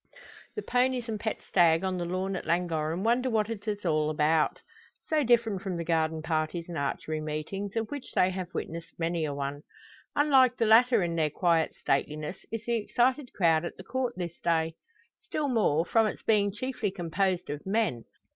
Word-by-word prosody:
The 425 - -4
ponies 250 -1 +1
and 215 -2 -3
pet 220 +1 -3
stag 170 -1 +4
on 185 -1 -1
the 175 - -2
lawn 185 +2 -2
at - - -5
Llangorren 165 0 0
wonder 245 +3 +2
what 220 -1 +1
it 215 -1 -7
is 205 -2 -3
all 155 -2 +2
about. 155 +1 +2 0.5
So 310 -2 +1
different 230 -5 +2
from 190 -3 -3
the 170 - -2
garden 160 -1 0
parties 160 +1 -1
and 175 - -6
archery 155 +2 -2
meetings, 155 +7 -4
of 225 -1 -1
which 285 -3 -7
they 185 +1 +3
have 185 -1 -5
witnessed 165 0 -6
many 165 -1 -1
a 150 - -2
one! 140 +1 -4 0.5
Unlike 265 -4 +4
the 230 - +2
latter 230 -1 +5
in 170 -1 -1
their 155 -2 +2
quiet 165 +1 +1
stateliness 150 +5 -2
is 225 0 -4
the 235 -1 +1
excited 250 +5 +1
crowd 165 -3 +3
at 170 - -6
the 185 - -9
Court 250 +3 -2
this 175 -2 -5
day; 165 -1 +1 0.5
still 300 -2 -3
more, 175 - +2
from 225 +2 +3
its - - -5
being 205 -2 +3
chiefly 235 0 -3
composed 180 -1 -1
of 150 +5 -6
men. 195 - 0
185 Hz, 190 wpm, -29 LUFS, 160-225 Hz, 0.5 s, latter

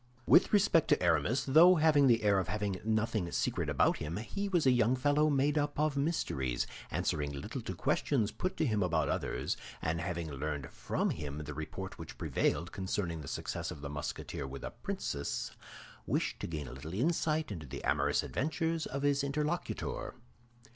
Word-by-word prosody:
With 180 - +6
respect 195 -6 +4
to - - +3
Aramis, 85 - +2
though 165 +7 +7
having 150 -3 +5
the 115 -3 +4
air 100 -2 +4
of 95 - -2
having 100 -1 -2
nothing 110 -4 0
secret - - -1
about - - +3
him, 75 +4 -4
he 200 - -3
was 175 -6 +2
a 130 - +6
young 120 0 +3
fellow 145 +4 +3
made 145 +1 +2
up 145 0 -2
of 150 -1 +2
mysteries, 70 - 0 0.2
answering 75 -1 -1
little 70 -1 -5
to - - -5
questions 115 -7 +1
put 185 - -3
to 160 - +2
him 110 -6 +1
about 90 - +1
others, - - -1 0.2
and 80 +1 -1
having 85 -3 -3
learned 70 -1 -4
from - - -1
him 75 0 -5
the 75 0 -6
report 75 +2 -6
which - - -8
prevailed 85 +5 0
concerning 95 -4 -2
the 70 - -9
success - - -3
of 70 - -7
the 70 -1 -5
Musketeer 75 -1 -4
with 70 +1 -8
a - - -4
princess, 70 - -3 0.6
wished - - 0
to - - -4
gain 75 -4 -4
a - - -8
little 75 +7 -7
insight 155 - +1
into 80 -7 -6
the 70 +2 -7
amorous 70 +1 +2
adventures 160 +2 -1
of 140 +1 -4
his 140 -1 +2
interlocutor. 150 +4 -2
105 Hz, 180 wpm, -32 LUFS, -, 0.6 s, though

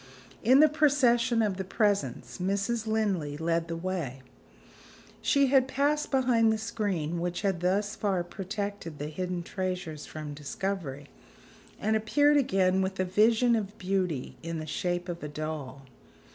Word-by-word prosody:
In 260 +5 +6
the 310 - +8
procession 255 -6 +3
of 200 -3 0
the 190 - -2
presents, 205 0 -1
Mrs. 200 +5 -1
Linley 195 -10 0
led 165 +1 0
the 165 - -3
way. 165 -8 -4 1.0
She 280 -1 +3
had 265 -1 +4
passed 290 +3 +1
behind 245 -4 +3
the 220 - +1
screen 200 -8 -2
which 175 0 -2
had 195 -3 +1
thus 200 +4 0
far 195 -4 0
protected 200 -3 -5
the 145 +1 -4
hidden 180 +2 -3
treasures 180 -5 -4
from 155 -1 -6
discovery, 145 -1 -4 0.7
and 220 +1 +1
appeared 290 +7 +3
again 190 -7 +2
with 190 0 -2
a 185 - +2
vision 225 +5 +4
of 205 -2 -3
beauty 180 -9 -2
in 165 0 -4
the 155 - -5
shape 175 +3 -2
of 175 -1 -5
a 150 - -4
doll. 150 -3 -5
190 Hz, 150 wpm, -29 LUFS, 170-220 Hz, 1.0 s, the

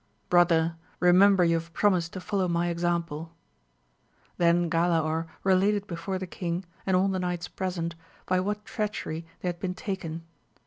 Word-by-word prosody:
Brother, 165 -2 +4 0.2
remember 185 +1 +6
you 170 -1 +3
have 165 0 -7
promised 180 -4 +2
to 185 - -5
follow 190 0 -1
my 170 0 +1
example! 170 -2 -2 1.0
Then 170 0 +3
Galaor 165 -1 +1 0.2
related 195 +2 +3
before 185 +1 -4
the 185 - -4
king, 175 0 -4 0.2
and 185 -1 +4
all 190 +2 +3
the 190 -1 -1
knights 180 -1 -2
present, 180 -3 -3 0.3
by 185 0 +2
what 210 +3 -2
treachery 170 -6 -3 0.2
they - - -1
had 175 -1 -5
been 185 -1 -3
taken. 180 -7 -4
175 Hz, 150 wpm, -27 LUFS, 170-190 Hz, 1.0 s, remember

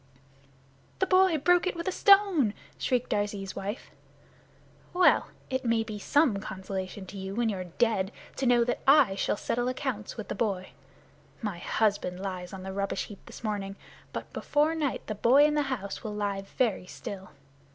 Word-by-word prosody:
"The 380 - +2
boy 370 -3 +4
broke 355 +5 +3
it 370 - -1
with 335 +1 -5
a - - +2
stone!" 385 - +5 0.2
shrieked 250 -1 0
Darzee's 205 -2 -2
wife. 200 +4 -5 1.0
"Well! 360 0 +5 0.2
It 260 0 -1
may 230 -2 +2
be 215 -2 -6
some 280 -1 +3
consolation 190 0 -5
to 195 +1 -8
you 190 +1 -5
when 235 0 +1
you're 185 -3 -3
dead 195 +2 0 0.3
to 265 - 0
know 240 -1 +5
that 245 - -1
I 275 -8 +6
shall 195 - 0
settle 240 +3 -1
accounts 255 -5 -3
with 220 - -6
the - - -3
boy. 195 -5 -2 0.7
My 200 -5 -3
husband 200 -4 0
lies 185 -2 -5
on 190 -1 -8
the 190 0 -5
rubbish 200 0 -2
heap 205 - -11
this - - -11
morning, 200 -2 -3 0.4
but - - -6
before 300 +2 +1
night 305 -5 -2
the 215 - -3
boy 250 +7 +5
in 300 - +2
the 300 - +2
house 200 -7 -4
will 210 -1 -4
lie 200 -1 -1
very 195 -2 -1
still. 190 0 -8
215 Hz, 175 wpm, -28 LUFS, 195-270 Hz, 1.0 s, I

